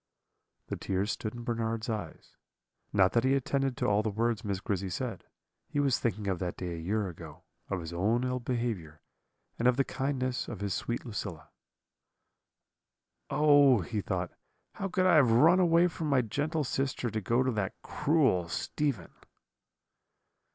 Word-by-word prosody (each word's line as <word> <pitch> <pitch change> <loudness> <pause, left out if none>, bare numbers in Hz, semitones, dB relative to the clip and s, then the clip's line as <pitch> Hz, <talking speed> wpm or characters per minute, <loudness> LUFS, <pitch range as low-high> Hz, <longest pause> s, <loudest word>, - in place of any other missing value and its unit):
"The - - -4
tears 100 +3 -1
stood 110 +1 -4
in 120 - -7
Bernard's 115 -2 -2
eyes 105 -8 -6 0.6
not 95 -2 +4
that 115 - +3
he 130 +1 +3
attended 135 -1 0
to - - -1
all 105 0 +3
the 110 - -1
words 115 +1 0
Miss 100 -3 -2
Grizzy 100 -1 -2
said; 90 - -4 0.4
he 145 -1 -2
was 140 -3 +2
thinking 110 -3 -2
of 95 -3 0
that 90 -2 -3
day 90 -2 -4
a - - -5
year 100 +5 -1
ago, 85 - -10 0.3
of 95 -3 -2
his 80 +1 -7
own 110 +8 +1
ill 125 0 -1
behaviour, 115 -11 -3 0.6
and 120 - +3
of 125 0 +4
the 135 - +4
kindness 130 -2 -2
of 110 - -6
his 100 -2 -2
sweet 120 +2 -3
Lucilla. 100 -8 -6 1.8
"'Oh!' 145 -4 +5
he 105 +5 -3
thought, 90 -2 -2 0.4
'how 195 - -3
could 185 0 +1
I 180 -3 +6
have 135 -6 +5
run 160 +11 +6
away 170 -1 +5
from 165 -2 -4
my 135 -3 +3
gentle 150 +8 -1
sister 135 -2 -2
to 110 0 -2
go 120 +6 +2
to 130 - +1
that 105 -3 -3
cruel 140 - +2
Stephen?' 135 - -2
115 Hz, 170 wpm, -30 LUFS, 100-135 Hz, 1.8 s, I